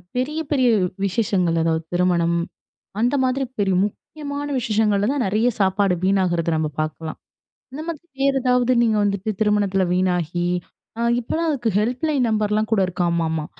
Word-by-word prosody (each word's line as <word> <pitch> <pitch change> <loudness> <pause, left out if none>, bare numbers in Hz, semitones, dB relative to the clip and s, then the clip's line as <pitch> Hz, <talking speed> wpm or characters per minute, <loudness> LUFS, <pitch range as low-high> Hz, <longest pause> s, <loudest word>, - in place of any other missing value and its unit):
பெரிய 275 +5 -1
பெரிய 260 -4 +3 0.4
விஷேசங்கள். 190 -4 +1
அதாவது 160 0 0
திருமணம் 175 -1 +2 0.6
அந்த 245 +5 +2
மாதிரி 260 +1 0
பெரிய 195 -2 +2
முக்கியமான 285 +6 -6
விஷேசங்கள்ல 210 -3 +1
தான் 280 -3 0
நெறைய 215 +5 +1
சாப்பாடு 195 0 +2
வீணாகுறத 185 -3 +1
நாம 155 -1 0
பார்க்கலாம். 155 +1 -4 0.5
இந்த 280 +4 -6
மாதிரி 335 -1 -6 0.2
வேற 275 0 +3
ஏதாவது 250 0 +2
நீங்க 220 -2 +2
வந்துட்டு 200 +1 -1
திருமணத்துல 205 -3 +2
வீணாகி 175 -2 0 0.5
அ - - -1 0.2
இப்பெல்லாம் 320 +8 -2
அதுக்கு 245 -6 0
ஹெல்ப் 245 +4 -1
லைன் 280 -5 +1
நம்பர்லாம் 215 0 0
கூட 215 -3 +3
இருக்காமாமா! 170 -3 -1
205 Hz, 140 wpm, -22 LUFS, 180-250 Hz, 0.6 s, பெரிய